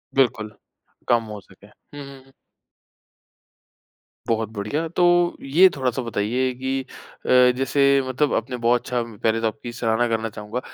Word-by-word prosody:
बिल्कुल, 110 -5 +1 0.6
कम 120 -1 +3
हो 105 - -7
सके। 95 +2 -20
हुँ, 145 +6 -13
हुँ, 135 -1 -13
हुँ। 135 - -23 2.0
बहुत 110 -1 -1
बढ़िया। 115 +11 -3
तो 175 +2 -1 0.4
ये 165 +8 +5
थोड़ा-सा 130 -2 -1
बताइए 120 +3 -1
कि 130 +1 -2 0.4
अ, - - -5 0.3
जैसे 140 +1 +3
मतलब 130 +3 0
आपने 125 +2 -2
बहुत 120 +1 +2
अच्छा 125 -1 -2
पहले 115 0 -2
तो 115 - +1
आपकी 115 +2 -6
सराहना 115 0 0
करना 115 -1 -1
चाहूँगा 105 +3 -6
120 Hz, 145 wpm, -22 LUFS, 110-135 Hz, 2.0 s, ये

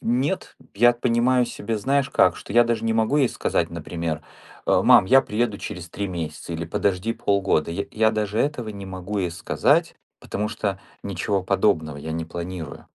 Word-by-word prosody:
Нет, 130 +10 -1 0.2
я 120 +4 +6
понимаю 120 +1 +2
себе, 110 +2 -4
знаешь, 140 +4 +1
как? - - +4
Что - - -9
я 120 0 +6
даже 115 -1 -1
не 115 - +1
могу 110 +5 +2
ей 135 -5 +4
сказать, - - -1
например, 80 -2 -4 0.4
э: - - +4
"Мам, - - +7
я 135 +4 +7
приеду 105 -1 -1
через 90 -4 -7
3 100 +4 -4
месяца!" 85 -1 -5
или 85 +1 -3
"Подожди 100 +4 0
полгода". 100 -7 +1
Я 100 +4 -2
я 110 0 +3
даже 105 -1 -2
этого 130 -6 -1
не 100 -2 -7
могу 95 +2 -5
ей 90 -3 -1
сказать, 90 +1 +1 0.2
потому 105 +1 -3
что 100 -3 -3 0.2
ничего 100 0 -1
подобного 90 -6 +1
я 80 +2 -6
не 80 0 -3
планирую. 85 -2 -7
100 Hz, 180 wpm, -23 LUFS, 90-115 Hz, 0.4 s, Мам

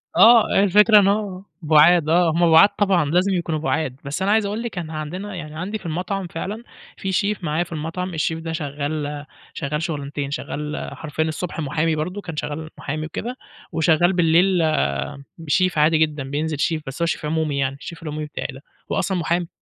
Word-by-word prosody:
آه، 230 -3 +6
الفكرة 210 +2 +6
إن 195 - +3
هو 200 -2 -1 0.2
بُعاد، 155 +1 +5
آه، 170 0 +4
هُم 170 0 +3
بُعاد 165 +5 +8
طبعًا، 190 -6 +3
لازم 185 +3 +2
يكونوا 165 -3 -1
بُعاد، 150 -4 -1
بس 145 +7 -4
أنا 200 +2 +2
عايز 220 -1 +3
أقُول 210 +3 -3
لِك 225 -6 -6
إن 165 -2 -4
عندنا 180 +6 -5
يعني 155 -3 -7
عندي 205 +5 -3
في 190 - -17
المطعم 180 +3 -3
فعلًا، 205 +7 -5 0.3
في 195 - -3
chef 200 -1 0
معايا 155 +2 0
في 170 - -15
المطعم، 165 +4 -4
الchef 160 - 0
ده 165 0 -5
شغّال 145 -1 -4 0.3
شغال 150 +1 -3
شغلانتين، 145 -3 -4
شغّال 150 +1 -4
حرفيًا 160 0 -3
الصبح 165 +2 -4
محامي 155 +2 0
برضه، 180 +7 -3
كان 165 -4 -7
شغّال 150 +1 -4
محامي 155 +2 -4
وكده، 245 +10 -5 0.3
وشغّال 165 +3 +3
بالليل، 175 +1 +3 0.9
chef 185 -3 +2
عادي 155 +2 +4
جدًا، 150 -3 0
بينزل 150 +2 -2
chef، 155 +2 0
بس 135 +5 -6
هو - - +3
chef 160 - -2
عمومي 155 -2 -1
يعني، 135 0 -1
الchef 170 -1 -8
العمومي 155 -1 -4
بتاعي 150 - -5
ده، 135 - -12 0.3
هو - - +1
أصلًا 190 -2 -1
محامي، 170 +1 0
165 Hz, 190 wpm, -22 LUFS, 150-185 Hz, 0.9 s, بُعاد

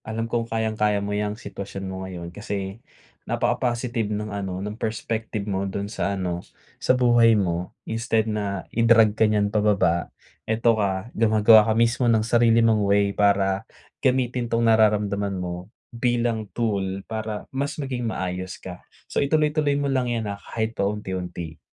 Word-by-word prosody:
Alam 110 +1 -4
kong 115 0 -2
kayang-kaya 110 -2 0
mo 105 - -3
‘yang 105 0 -1
sitwasyon 100 -2 -7
mo 95 0 -5
ngayon 90 -2 -7
kasi, 100 0 -5 0.5
napaka-positive 120 -2 0
nung 105 0 -3
ano, 95 -2 -3
ng 105 - -4
perspective 110 -1 -3
mo 100 -1 -2
dun 100 +2 -4
sa 100 0 -1
ano, 90 -2 -2 0.4
sa 130 - +3
buhay 120 -2 +5
mo. 90 -3 -2
Instead 115 -1 0
na 100 -4 -3
i-drag 115 -2 +5
ka 110 0 +3
niyan 105 -1 +1
pababa, 100 -5 +2 0.4
ito 115 +1 +3
ka, 95 +3 -2
gumagawa 110 0 +6
ka 110 - +2
mismo 115 +1 +2
ng 110 -1 +3
sarili 115 0 +4
mong 105 -3 +3
way 100 0 +3
para 100 -1 +1 0.3
gamitin 125 -2 +1
'tong 115 0 +1
nararamdaman 105 -3 +2
mo, 90 +1 -5 0.2
bilang 115 -3 0
tool 100 -4 -1
para 110 -1 -4
mas 140 +2 -2
maging 130 -5 -3
maayos 90 -1 -4
ka. 90 -1 -9 0.3
So - - +1
ituloy-tuloy 150 0 +2
mo 140 -1 0
lang 125 -2 +1
'yan, 115 -2 -1
ah, 100 -1 -5
kahit 110 0 -3
pa 100 -2 0
unti-unti. 90 -5 -5
105 Hz, 155 wpm, -24 LUFS, 100-115 Hz, 0.5 s, gumagawa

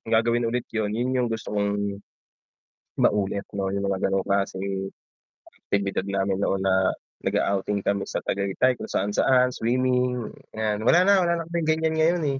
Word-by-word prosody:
gagawin 115 +1 +2
ulit 120 +1 -1
'yun, 110 -2 0
'yun 125 +2 0
'yung 125 -1 +1
gusto 110 -2 -5
kong, 100 -1 -1 1.0
maulit 100 -1 +1
'no 95 -1 -1
'yung 100 0 -1
mga 95 -1 0
gano'ng 95 -1 0
klaseng 95 0 -1 0.8
aktibidad 100 -1 0
namin 100 -1 0
noon 95 -1 0
na 95 -1 +2 0.3
nag-a-outing 100 +1 0
kami 100 0 0
sa - - -3
Tagaytay, 100 +6 +1
kung - - -6
saan-saan, 125 +6 +2
swimming, 125 0 0 0.2
'yan. 110 0 -2
Wala 175 +8 +6
na 200 +2 +5
wala 170 - +2
na 165 - -8
kaming 170 -2 -1
ganiyan 160 0 +1
ngayon, 165 +1 +2
eh. - - -7
105 Hz, 160 wpm, -25 LUFS, 100-125 Hz, 1.0 s, Wala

